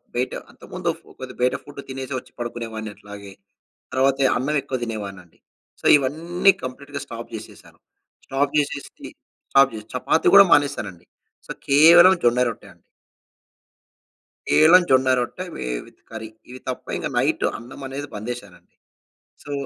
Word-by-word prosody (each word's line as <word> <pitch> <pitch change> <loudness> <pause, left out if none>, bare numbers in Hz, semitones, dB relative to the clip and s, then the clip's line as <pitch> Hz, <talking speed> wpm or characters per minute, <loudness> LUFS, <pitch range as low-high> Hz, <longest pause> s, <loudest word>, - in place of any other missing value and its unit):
బయట 125 +1 -1 0.2
అంతముందొఫు - - -5 0.2
కొద్దిగా 130 -1 -9
బయట 125 +1 +2
ఫుడ్డే 145 -1 -10
తినేసి 130 0 -6
వచ్చి - - -10
పడుకునేవాడిని 115 -2 -5
అట్లాగే. 100 -1 -11 0.6
తర్వాతె 135 +1 +2
అన్నవెక్కువ 135 0 -1
తినేవాడినండి. 100 -6 -8 0.4
సో, - - -6
ఇవన్నీ 165 +7 +2
కంప్లీట్‌గా 140 +3 -7
స్టాప్ 115 0 -8
చేసేశాను. 110 -1 -11 0.5
స్టాప్ 140 +1 0
చేసేసి 140 -1 -4 0.4
స్టాప్ 135 -2 +5
జెస 105 0 -8
చపాతీ 130 +5 +1
గూడా 200 0 +10
మానేశానండి. 115 -12 +1 0.4
సో, - - -13 0.2
కేవలం 170 +6 +8
జొన్న 120 +1 +4
రొట్టె 115 -3 -8
అండి. 85 - -26 1.8
ఈలం 165 +4 +7
జొన్న 130 0 +4
రొట్టె, 125 +9 -4
వే - - -5 0.2
విత్ - - -21
కర్రీ. 110 -1 -7 0.2
ఇవి 130 - -10
తప్ప 125 - -5
ఇంక - - -3
నైట్ - - +1
అన్నం 120 +4 -12
అనేది 140 +2 -6
బంద్ 105 +3 -6
జేసారండి. 100 -7 -11 0.7
సో 145 - -9
130 Hz, 135 wpm, -22 LUFS, 115-140 Hz, 1.8 s, గూడా